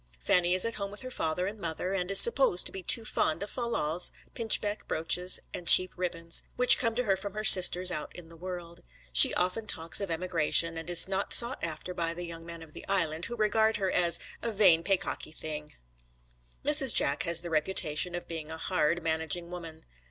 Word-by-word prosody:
Fanny 175 - 0
is 185 - +2
at 230 -1 -5
home 200 -1 -6
with 205 +1 -5
her 255 - -9
father 165 -3 -4
and 205 +3 -8
mother, 170 +2 -5
and 180 -1 -4
is 195 - +5
supposed 235 -7 +3
to - - 0
be 190 - -9
too 225 +5 +2
fond 165 -3 -2
of 205 - -9
fal 240 -2 -4
lals, 165 -4 -2 0.2
pinchbeck 215 -2 -1
brooches 180 +3 +3
and 175 - -8
cheap 185 +1 +6
ribbons, 170 -2 -3
which 250 0 +6
come 230 -2 -2
to 250 - -2
her 195 -4 -1
from 200 +1 -9
her 215 - -6
sisters 185 -3 +7
out 150 - -6
in 175 -2 -13
the 165 - -16
world. 175 0 -10 0.3
She - - +9
often 185 +5 -3
talks 165 +4 -2
of 200 - -5
emigration, 165 -1 0
and 165 +1 -9
is 175 +1 +4
not 195 +1 -3
sought 240 -2 +2
after 170 +2 -6
by 170 -1 -5
the 175 0 -7
young 165 -1 -11
men 170 -1 -10
of 155 -1 -18
the - - -12
Island, 165 -4 -1
who 240 - -8
regard 220 0 -1
her 190 -2 -3
as 170 -2 +2 0.2
a 230 - -4
'vain 190 -6 +3
paycocky 190 -4 -3
thing.' 150 -1 -9 0.9
Mrs. - - +4
Jack - - +3
has 170 0 0
the 170 -1 -9
reputation 160 +1 -1
of 175 - -8
being 160 -2 -9
a 160 - -9
hard, 170 -1 -3
managing 160 +2 -3
woman. 165 -2 -11
180 Hz, 210 wpm, -27 LUFS, 165-195 Hz, 0.9 s, She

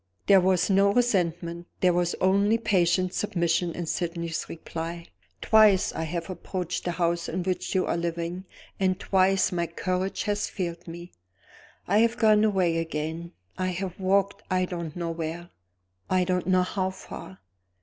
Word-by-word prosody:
There 195 -2 +6
was 185 -1 +2
no 200 0 +4
resentment 175 -7 0
there 180 -1 +4
was 175 0 0
only 200 +4 +3
patient 185 -4 +1
submission 170 -3 0
in 175 - -3
Sydney's 170 0 -3
reply. 165 +1 -6 0.4
"Twice 215 -4 +5
I 160 - -3
have 170 +1 -4
approached 180 -1 -4
the 175 - -1
house 170 0 0
in 180 +2 -2
which 185 +1 -2
you 185 - +2
are - - -1
living; 170 +2 -3 0.3
and 185 -1 +1
twice 190 -1 +2
my 170 -1 -1
courage 185 +3 -2
has 205 -1 -1
failed 175 -3 -5
me. 170 +1 -9 0.8
I 205 - +3
have 230 +1 +3
gone 215 -2 +5
away 185 -6 +2
again 160 +1 -4 0.3
I 185 - 0
have 185 0 -4
walked, 200 +1 +1
I 185 -1 +2
don't 170 -3 -6
know 170 -1 -3
where, 165 +1 -5 0.6
I 185 0 +3
don't 180 -1 -1
know 185 -1 +4
how 185 0 -1
far. 185 - -10
180 Hz, 160 wpm, -26 LUFS, 170-190 Hz, 0.8 s, There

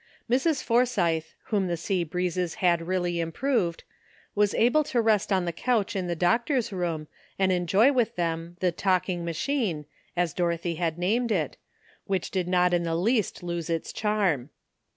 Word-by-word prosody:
Mrs. 270 +3 +1
Forsythe, 205 -10 +2 0.3
whom 200 -3 +2
the 170 -1 -1
sea 180 +2 -1
breezes 180 +1 -2
had 170 -2 +1
really 175 -2 0
improved, 170 - -1 0.5
was 205 -1 +2
able 250 +7 +4
to 245 - 0
rest 220 -3 +2
on 190 -2 +2
the 170 - -1
couch 215 +3 0
in 185 -2 -1
the 175 - -1
doctor's 235 - +1
room 170 -4 -2 0.3
and 190 -1 +2
en 180 -1 0
joy 220 +10 +5
with 240 -3 +1
them 165 0 -3
the 180 -1 +3
''talking 185 0 0
machine," 170 - -1 0.3
as 175 -3 +1
Doro 170 -1 0
thy 170 +1 -3
had 165 -1 -2
named 225 +7 +1
it, 160 -9 0 0.5
which 190 -1 -2
did 185 -2 -1
not 180 0 +3
in 175 - +3
the 165 -1 -1
least 210 +2 0
lose 170 -2 -3
its 165 -1 -2
charm. 195 - 0
180 Hz, 170 wpm, -27 LUFS, 170-215 Hz, 0.5 s, joy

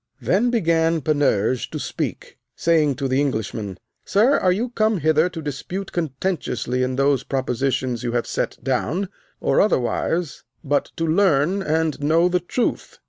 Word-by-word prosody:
Then 190 - +2
began 165 -7 +2
Panurge 130 -6 +1
to - - -5
speak, - - -5 0.2
saying 155 -4 +2
to 135 - -2
the 130 +2 +1
Englishman, 110 -7 -3 0.3
Sir, 230 +8 +3
are 185 - +3
you 225 +7 -1
come 220 -2 +1
hither 155 +2 +3
to 165 -3 -7
dispute 160 +7 -5
contentiously 140 -5 -2
in 130 0 0
those 140 -1 +2
propositions 130 -2 -1
you 120 -1 -3
have 120 -1 0
set - - -2
down, 150 +9 -1 0.3
or, - - +2
otherwise, 165 - 0 0.2
but 145 -1 +1
to 165 - -1
learn 170 +1 +2
and 160 -3 0
know 165 +4 +3
the 180 0 +2
truth? 180 +8 -2
155 Hz, 150 wpm, -22 LUFS, 130-180 Hz, 0.3 s, Sir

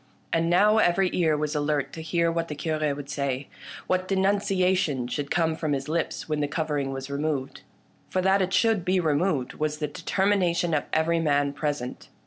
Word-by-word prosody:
And 165 0 +2
now 210 +5 +5
every 185 -1 +3
ear 160 -4 +2
was 150 0 -2
alert 145 -2 -1
to 160 - -6
hear 170 +1 +1
what 165 0 -1
the 150 - -5
Cure 155 +1 -2
should 145 -2 -2
say, 140 -1 -3 0.4
what 185 0 0
de 195 - 0
nunciation 190 -8 +1
should 140 +2 -3
come 160 -2 +1
from 155 -2 -1
his 135 0 -3
lips 165 +2 -2
when 155 -1 -1
the 145 - 0
cover 150 0 -1
ing 135 -1 -2
was 135 +1 -6
removed. 140 -2 -2 0.5
For 185 - 0
that 190 +1 +3
it 185 0 0
should 220 -2 +2
be 185 +1 +2
removed 150 -4 0
was 155 0 -2
the 150 -1 -2
determination 180 +1 0
of 150 - +1
every 165 +1 +2
man 145 -3 +1
present. 145 -4 -4
155 Hz, 195 wpm, -26 LUFS, 145-180 Hz, 0.5 s, now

